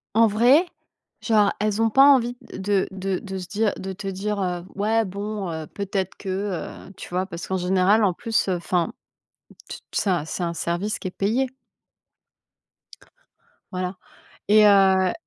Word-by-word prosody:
En 230 +1 +6
vrai, 245 - +4 0.6
genre, 210 -3 +3
elles 210 0 0
ont 225 - +4
pas 270 +5 +6
envie 250 -4 +4 0.2
de 195 0 0
de 190 -1 -3
de 190 -1 -6
se 180 - -7
dire 210 +2 0
de 190 0 -5
te 195 +1 -6
dire, 200 +2 -3
heu: 180 -1 -2
«Ouais, 220 +3 +1
bon, 200 0 -4
heu, 160 -1 -5
peut-être 195 -2 -3
que», 195 - -9 0.6
heu, - - -13
tu - - -9
vois? 180 +1 -1
Parce 170 -2 -7
qu'en 190 - -1
général, 190 +4 +3
en 195 -3 +3
plus, 225 +3 -1
heu, 185 - +1
enfin, 175 +3 -1 0.8
tu - - -6
t - - -46
ça, 180 -6 0
c'est 180 - -4
un 170 -1 -1
service 175 +6 -2
qui 185 - -4
est - - -7
payé. 225 +8 0 2.2
Voilà 185 +1 -3 0.5
et 210 0 +7
heu 190 -2 +5
195 Hz, 170 wpm, -23 LUFS, 185-215 Hz, 2.2 s, et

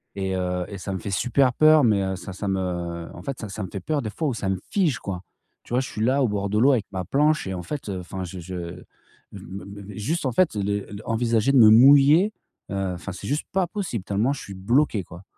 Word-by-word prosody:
et 95 -1 -2
heu, 90 -1 -1
et 100 - -6
ça 95 +1 -4
me 95 - -3
fait 100 - -6
super 125 +6 +2
peur, 155 +1 +6
mais 100 -3 +3
heu, 95 0 -2
ça 95 +1 -8
ça 100 +2 -5
me 90 -3 -3
en 85 - -10
fait, 135 -4 -5
ça 100 +1 -5
me 95 - -6
fait 100 - -5
peur, 150 +6 -1
des 110 - -3
fois, 155 +7 -2
où - - -1
ça 100 - -3
me 95 - 0
fige, 175 - +1
quoi. 90 -2 -5 0.4
Tu - - -9
vois, 125 - +3
je 130 - -5
suis 110 - -5
là 135 +4 +2
au - - +3
bord 100 -1 -2
de 105 - 0
l'eau 135 +4 +6
avec 110 -5 0
ma 95 -1 -3
planche 150 - +2
et 95 - -3
en 90 -1 -5
fait, 135 - -5
enfin, 95 0 -5
je 90 +1 -8
je 90 +2 -7
m 90 +1 -7 0.5
me 95 +3 -8 0.2
me 100 +1 -10
juste, 150 +10 -2
en 130 - +1
fait, 175 +3 +3
les 100 0 0
l 105 +1 -8
envisager 115 +2 +1
de - - +5
me 110 -3 +9
mouiller, 140 - +7 0.4
heu, 95 -2 -1
enfin, 95 +3 -7
c'est 90 - -8
juste 145 +3 -1
pas 190 -1 +2
possible 175 - -4
tellement 105 +7 +1
je 140 - -7
suis 100 - -9
bloqué 110 +2 +1
quoi. 90 +1 -12
105 Hz, 260 wpm, -24 LUFS, 95-135 Hz, 0.5 s, me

